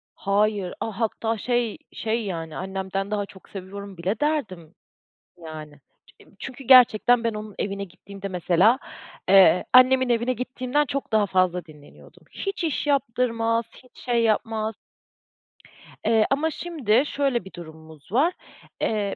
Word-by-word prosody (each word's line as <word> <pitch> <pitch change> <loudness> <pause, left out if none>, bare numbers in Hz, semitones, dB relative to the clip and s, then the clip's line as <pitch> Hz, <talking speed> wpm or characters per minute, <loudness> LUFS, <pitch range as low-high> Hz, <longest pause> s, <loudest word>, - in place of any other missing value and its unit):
Hayır, 200 -2 0
aaa, 220 -1 -5
hatta, 225 0 -1
şey, 240 -1 -1 0.2
şey, 225 0 -2
yani, 165 -5 -5
annemden 190 +1 -4
daha 205 -1 -1
çok 190 -1 -17
seviyorum 195 0 -8
bile 190 +6 -2
derdim, 210 - -2 0.6
yani. 155 -3 -10 0.4
Ç - - -16
çünkü 265 +1 -8
gerçekten 245 -1 +6
ben 230 -2 0
onun 210 -1 -7
evine 200 0 -3
gittiğimde 195 +2 -10
mesela, 185 +6 +3 0.5
ııı, 185 -2 +7
annemin 255 0 +6
evine 235 +1 +1
gittiğimden 255 +3 -1
çok 275 -4 -4
daha 215 -2 +3
fazla 185 -2 +1
dinleniyordum. 150 -3 -17
Hiç 390 -3 -4
iş 310 -2 -1
yaptırmaz, 230 -4 +1 0.2
hiç 250 - -22
şey 240 -2 +1
yapmaz, 220 0 0 1.3
ııı, 220 -1 +4
ama 305 +4 +1
şimdi 275 -9 +1
şöyle 275 -8 -1
bir 190 - -12
durumumuz 160 -2 -13
var. 300 - +3 0.5
Eee, 205 -2 -1
215 Hz, 135 wpm, -24 LUFS, 190-250 Hz, 1.3 s, ııı